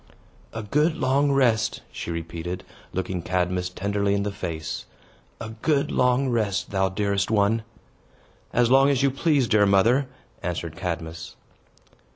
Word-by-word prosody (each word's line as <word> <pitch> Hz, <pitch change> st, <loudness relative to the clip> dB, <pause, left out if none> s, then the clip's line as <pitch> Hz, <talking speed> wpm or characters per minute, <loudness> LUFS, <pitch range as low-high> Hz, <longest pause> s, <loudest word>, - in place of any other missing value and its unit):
"A 115 Hz, -, -5 dB
good 150 Hz, +9 st, +1 dB
long 140 Hz, -1 st, +2 dB
rest!" 120 Hz, -6 st, +2 dB
she -, -, -6 dB
repeated, 85 Hz, +1 st, -5 dB, 0.3 s
looking 95 Hz, -1 st, -3 dB
Cadmus 90 Hz, +1 st, -1 dB
tenderly 100 Hz, +2 st, 0 dB
in 100 Hz, -, 0 dB
the 105 Hz, -, -2 dB
face. 85 Hz, -5 st, -5 dB, 0.5 s
"A 110 Hz, -, -6 dB
good 140 Hz, +6 st, 0 dB
long 125 Hz, +2 st, +2 dB
rest, 110 Hz, -6 st, -1 dB
thou 95 Hz, -1 st, +1 dB
dearest 100 Hz, 0 st, 0 dB
one!" 110 Hz, +1 st, +2 dB, 0.9 s
"As 120 Hz, 0 st, +2 dB
long 135 Hz, +1 st, +6 dB
as 140 Hz, -1 st, +2 dB
you 140 Hz, -, +4 dB
please, 140 Hz, -2 st, +2 dB
dear 105 Hz, -3 st, +4 dB
mother," 115 Hz, +8 st, +4 dB, 0.3 s
answered 85 Hz, -2 st, -4 dB
Cadmus. 85 Hz, -2 st, -5 dB
100 Hz, 140 wpm, -25 LUFS, 90-125 Hz, 0.9 s, long